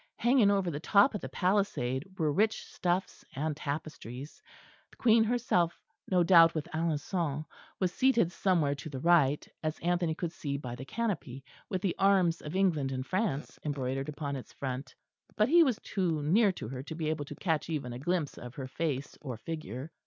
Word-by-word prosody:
Hanging 240 -3 +4
over 195 -3 +1
the 145 - -4
top 200 - +4
of 210 - -3
the - - -6
palisade 185 -5 0
were 155 -3 +1
rich 215 +6 +1
stuffs 180 +1 -2
and 150 +2 -1
tapestries. 145 -3 -6 0.5
The - - -21
Queen 225 -2 +5
herself 220 -8 +1 0.3
no 180 -2 +4
doubt 165 -2 +7
with 155 -1 -2
Alençon 155 -1 -1 0.3
was 180 -2 0
seated 235 -9 +3
somewhere 170 -6 +2
to 145 +2 -7
the 140 - -6
right, 150 -3 +3
as 155 0 -2
Anthony 175 -2 0
could 170 0 -3
see 140 -4 -4
by 125 -4 -6
the 125 +2 -7
canopy, 155 - -3 0.3
with 185 0 -2
the 190 - 0
arms 190 -4 +3
of 150 +4 -6
England 165 -8 +2
and 130 0 -3
France 185 -6 -2
embroidered 135 -1 -2
upon 145 -2 -4
its 130 - -8
front; 130 0 -5 0.4
but 215 +3 +3
he 340 +3 +7
was 260 -9 +3
too 170 -7 -1
near 200 +7 +4
to 110 - -7
her 130 0 -5
to 160 +4 -7
be 155 -1 -1
able 150 -2 -3
to - - -8
catch 160 -4 -1
even 140 -6 -3
a 120 - -6
glimpse 165 0 -1
of 125 0 -9
her 135 - -5
face 140 -1 -3
or 130 -6 -5
figure. 155 0 -6
160 Hz, 190 wpm, -31 LUFS, 140-190 Hz, 0.5 s, doubt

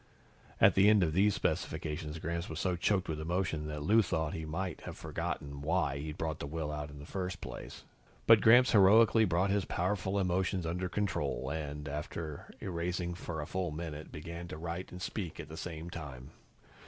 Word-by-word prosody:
At - - +7
the 100 +2 +6
end 105 -3 +6
of 80 -2 +1
these 100 +3 +4
specifications, 75 0 -2
Gramps 85 +2 -3
was 80 - -4
so 90 -1 +1
choked 95 +2 +1
with 80 -1 -3
emotion 80 -2 -1
that 75 -1 -4
Lou 110 +7 +5
thought 80 -6 -1
he 80 - -4
might 85 +2 -3
have - - -7
forgotten 70 0 -4
why 75 -3 +1
he'd 75 +1 -5
brought 80 -2 -2
out - - -30
the - - -4
will 75 0 -3
in 75 -1 -5
the 70 - -9
first 95 +2 -4
place. - - -8 0.4
But 115 -2 +8
Gramps 125 +3 +7
heroically 110 +2 +6
brought 90 +2 +2
his 100 -1 +2
powerful 95 +2 -1
emotions 95 -1 +1
under 90 +2 -2
control 90 -9 -1
and, 75 -2 -4
after 75 +1 -5
erasing 85 0 -2
for 80 -2 -5
a - - -4
full 95 +2 -2
minute, 80 -1 -6
began 85 +3 -7
to 75 - -7
write 85 +2 -5
and 90 - -8
speak 90 -2 -4
at 75 - -7
the 80 - -7
same 80 0 -6
time. 70 -4 -8
85 Hz, 190 wpm, -32 LUFS, 75-95 Hz, 0.4 s, But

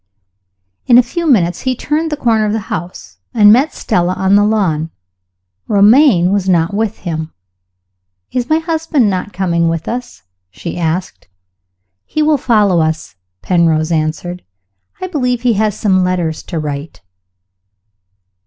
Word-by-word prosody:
In 240 - +6
a 250 - +6
few 335 +8 -4
minutes 175 -9 +2
he 260 -1 -1
turned 310 +5 -2
the 300 - -2
corner 225 -5 +1
of 210 - -1
the 220 +1 -4
house, 175 -1 -7 0.2
and 210 -2 +7
met 275 +6 +2
Stella 180 +1 -1
on 190 +1 +1
the 205 - +5
lawn. 185 -8 0 0.8
Romayne 205 - +4
was 195 -2 0
not 170 0 +2
with 215 0 -1
him. 160 -2 -4 1.0
"Is 250 -1 -2
my 315 - +3
husband 320 - 0
not 185 +2 -3
coming 170 -3 0
with 165 -1 -3
us?" 245 +1 -6 0.3
she 95 +1 -7
asked. 170 +2 -3 0.8
"He 310 - -2
will 300 -2 +2
follow 210 -8 +2
us," 160 -9 -3 0.3
Penrose 165 -2 +1
answered. 160 +3 -2 0.6
"I - - -4
believe 250 -9 -2
he 245 -2 +3
has 215 0 0
some 190 -3 +2
letters 175 -3 -1
to 170 - -5
write." 145 -2 -5
200 Hz, 145 wpm, -15 LUFS, 170-245 Hz, 1.0 s, and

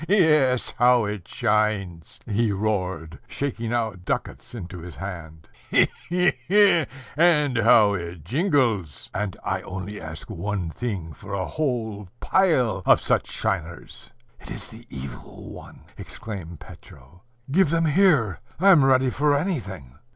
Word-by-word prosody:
"He, 200 - +4
he, 195 - +5
he! 160 - +3
yes, 130 -5 +2
how 120 -2 +5
it 105 -4 -5
shines!" 105 - -1
he 110 +1 0
roared, 95 -5 -2
shaking 120 -5 -4
out 110 -7 -2
ducats 120 - -4
into 90 -4 -7
his 85 -2 -10
hand: 80 -2 -8 0.2
"he, - - +5 0.2
he, 180 0 +3 0.2
he! 195 -5 +5 0.3
and 150 -4 +3
how 110 -2 +5
it 85 -4 -6
jingles! 120 - 0
And 100 -1 -3
I - - -2
only 95 +2 -7
ask 80 0 -8
one 100 -3 -3
thing 95 -7 -5
for 100 +5 -10
a 95 -1 -2
whole 115 - -3
pile 130 - +2
of - - +6
such - - 0
shiners." 90 -6 -4 0.3
"It - - -12
is - - -6
the - - -14
Evil 65 -2 -9
One!" - - -12 0.2
exclaimed 90 -7 -8
Petro: 70 +8 -15 0.3
"Give 185 +1 +4
them 165 +1 +1
here! 150 - +3 0.2
I'm 185 -5 +6
ready 130 -1 +3
for 145 +2 +2
anything!" 95 - -4
110 Hz, 145 wpm, -24 LUFS, 90-140 Hz, 0.3 s, of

